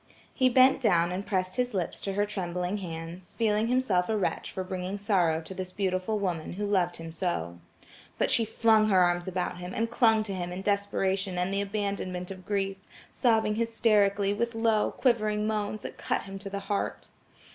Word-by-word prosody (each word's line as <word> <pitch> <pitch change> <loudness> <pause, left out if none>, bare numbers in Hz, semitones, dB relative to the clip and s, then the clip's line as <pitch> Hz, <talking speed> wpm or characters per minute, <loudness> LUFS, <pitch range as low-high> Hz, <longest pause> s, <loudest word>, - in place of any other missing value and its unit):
He 255 -1 +3
bent 260 +2 +5
down 175 -7 +3
and 185 +2 -3
pressed 185 +1 -1
his 250 -3 0
lips 180 -3 -2
to 195 - -3
her 205 +1 +1
trembling 180 -1 -3
hands, 170 -1 -7
feeling 220 -1 +2
himself 230 -8 +1
a 220 - +1
wretch 195 - -1
for 190 - -4
bringing 185 +1 -4
sorrow 180 -6 +2
to 165 - -9
this 185 -1 -6
beautiful 190 +2 -1
woman 180 -6 -2
who 205 +3 -3
loved 185 -4 +1
him 165 0 -7
so. 160 - -3 0.6
But - - +1
she 230 - +3
flung 220 -1 +3
her 190 -2 +5
arms 175 0 +2
about 180 -1 -2
him, 180 +1 -6
and 230 +1 -1
clung 225 -2 +4
to 205 -2 -5
him 175 -1 -4
in 185 +2 -5
desperation 195 -2 0
and 180 +2 0
the 200 - +1
abandonment 200 -3 -3
of 185 -1 -10
grief, 195 -1 -1 0.3
sobbing 220 -4 +2
hysterically, 210 -3 +2
with 235 +2 -2
low, 225 -1 +2
quivering 215 -4 +1
moans, 215 -1 -2
that - - -8
cut - - -1
him 195 0 -8
to 195 0 -7
the 200 0 -4
heart. 205 -1 -3
200 Hz, 190 wpm, -28 LUFS, 180-215 Hz, 0.6 s, bent